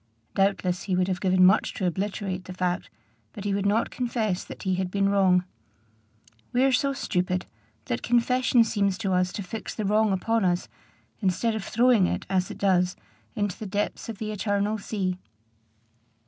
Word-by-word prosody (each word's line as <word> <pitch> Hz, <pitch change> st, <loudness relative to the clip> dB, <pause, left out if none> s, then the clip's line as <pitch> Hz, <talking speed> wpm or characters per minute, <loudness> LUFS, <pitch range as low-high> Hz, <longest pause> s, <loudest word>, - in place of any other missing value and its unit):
Doubtless 195 Hz, -2 st, +1 dB
he 190 Hz, -, 0 dB
would 185 Hz, 0 st, +2 dB
have 185 Hz, -2 st, -2 dB
given 185 Hz, -1 st, +4 dB
much 195 Hz, +4 st, +3 dB
to 190 Hz, -, -2 dB
obliterate 190 Hz, 0 st, -2 dB
the 185 Hz, -, -8 dB
fact, 180 Hz, 0 st, -1 dB, 0.4 s
but 205 Hz, -, -7 dB
he 205 Hz, -1 st, 0 dB
would 200 Hz, 0 st, 0 dB
not 215 Hz, +3 st, +1 dB
confess 225 Hz, -6 st, -1 dB
that -, -, -10 dB
he 190 Hz, -, 0 dB
had 185 Hz, 0 st, -1 dB
been 195 Hz, +1 st, +1 dB
wrong. 185 Hz, -2 st, +3 dB, 1.1 s
We 250 Hz, +1 st, +3 dB
are 270 Hz, -, +4 dB
so 275 Hz, +2 st, +2 dB
stupid, 180 Hz, -8 st, -1 dB, 0.4 s
that 120 Hz, 0 st, -2 dB
confession 245 Hz, 0 st, +3 dB
seems 200 Hz, -4 st, 0 dB
to 195 Hz, -3 st, -1 dB
us 180 Hz, 0 st, +2 dB
to 205 Hz, -, -4 dB
fix 215 Hz, +5 st, -6 dB
the 215 Hz, -, -2 dB
wrong 210 Hz, +1 st, +3 dB
upon 225 Hz, +4 st, +1 dB
us, 180 Hz, -1 st, +1 dB, 0.5 s
instead 215 Hz, +3 st, +1 dB
of 220 Hz, -2 st, -3 dB
throwing 230 Hz, -4 st, +3 dB
it, -, -, -3 dB
as 185 Hz, -1 st, +1 dB
it -, -, -7 dB
does, 180 Hz, -2 st, +2 dB, 0.4 s
into 205 Hz, -3 st, -2 dB
the 215 Hz, -, -5 dB
depths 205 Hz, +3 st, -2 dB
of 225 Hz, -, -5 dB
the 215 Hz, +1 st, -4 dB
eternal 205 Hz, +1 st, 0 dB
sea. 190 Hz, -3 st, -2 dB
195 Hz, 180 wpm, -26 LUFS, 185-220 Hz, 1.1 s, given